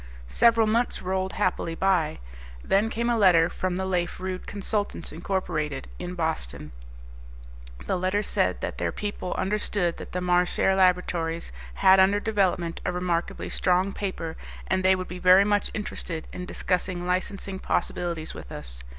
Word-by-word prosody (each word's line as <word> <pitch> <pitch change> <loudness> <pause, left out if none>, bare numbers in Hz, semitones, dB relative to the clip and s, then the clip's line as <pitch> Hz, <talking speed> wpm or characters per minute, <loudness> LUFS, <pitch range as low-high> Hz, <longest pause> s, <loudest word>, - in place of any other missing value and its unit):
Several 230 - +4
months 230 +3 0
rolled 190 +1 -1
happily 170 -2 -1
by. 180 -4 +1 0.5
Then 205 +3 +2
came 235 +1 -1
a 240 - +2
letter 175 -4 +6
from 185 -1 -2
the 190 +1 -2
Lafe 180 -2 -1
Rude 185 0 -5
Consultants, 205 -2 -3
Inc., 185 +4 -2 0.4
up - - -9
in 180 0 -5
Boston. 160 - -3 1.1
The 185 - 0
letter 185 +3 +1
said - - 0
that - - -4
their - - 0
people 205 -3 -4
understood 195 -3 0
that - - -9
the 180 - -2
Marchare 180 +1 +2
Laboratories 180 -3 +1 0.2
had 190 0 +6
under 195 +2 +5
development 190 -6 0
a - - 0
remarkably 180 -1 -2
strong 185 +2 +1
paper, 165 -5 -4 0.3
and 190 0 +1
they 190 0 +5
would 185 0 -5
be 180 - -7
very 185 +2 +7
much 205 0 +1
interested 170 -6 -4
in 180 0 -6
discussing 180 -1 -1
licensing 190 +1 -2
possibilities 170 -4 -2
with - - -10
us. - - -7
185 Hz, 155 wpm, -26 LUFS, 175-195 Hz, 1.1 s, very